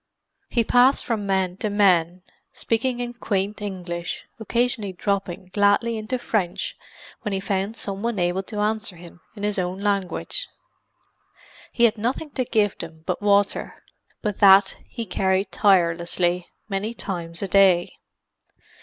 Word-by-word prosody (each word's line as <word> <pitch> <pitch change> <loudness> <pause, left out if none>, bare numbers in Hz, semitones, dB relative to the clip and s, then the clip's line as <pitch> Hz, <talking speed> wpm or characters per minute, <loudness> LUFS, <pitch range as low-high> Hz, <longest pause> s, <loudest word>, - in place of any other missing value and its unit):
He 235 - +2
passed 250 +4 +4
from 215 -4 -2
man 190 -2 0
to 215 - -1
man, 180 -4 +3 0.3
speaking 240 +2 -1
in 240 0 -3
quaint 205 -3 -2
English, 175 -4 -5
occasionally 230 -3 -1
dropping 185 -1 -3
gladly 205 +3 +3
into 220 +4 -3
French 200 -7 -2 0.5
when 210 -5 -3
he 195 - 0
found 195 +2 -2
some 195 -1 -4
one 230 -1 -1
able 175 +1 +1
to 210 +2 -5
answer 215 -2 -1
him 175 0 -14
in 205 - -8
his 205 -1 0
own 180 +1 -2
language. 200 -3 -1 1.2
He 235 - 0
had 225 -2 +4
nothing 260 +7 -2
to 255 -3 -1
give 210 -4 +1
them 160 -1 -8
but - - -2
water; 205 -1 +2 0.5
but 210 -3 -2
that 195 -1 +7
he 230 -3 -5
carried 190 0 0
tirelessly 175 -1 +2 0.2
many 210 +3 -3
times 170 -4 -4
a - - -1
day. 190 -2 +4
200 Hz, 145 wpm, -23 LUFS, 185-220 Hz, 1.2 s, that